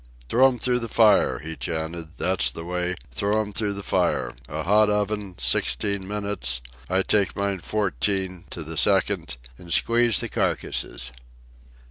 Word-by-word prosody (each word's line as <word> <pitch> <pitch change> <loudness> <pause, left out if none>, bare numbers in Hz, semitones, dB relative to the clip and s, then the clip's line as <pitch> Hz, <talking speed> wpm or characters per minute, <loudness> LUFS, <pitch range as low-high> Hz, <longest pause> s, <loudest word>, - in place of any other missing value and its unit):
"Throw 130 +3 +6
'em 130 -2 -1
through 125 +1 +2
the 115 -1 -4
fire," 110 -2 +4
he 80 +3 -6
chanted. 80 0 -4
"That's 95 0 +1
the 80 - -8
way—throw 90 - -1
'em 105 -1 -3
through 105 -1 0
the 100 0 -7
fire—a 65 +3 -1
hot 105 +4 +4
oven, 105 -2 -1
sixteen 65 +10 0
minutes—I 70 -6 -2
take 100 -4 +2
mine 100 -1 -1
fourteen, 95 -2 -1
to 80 - -5
the 80 +1 -6
second—an' 60 +2 0
squeeze 115 +6 +3
the - - -1
carcasses." - - -1
95 Hz, 135 wpm, -24 LUFS, 80-105 Hz, -, Throw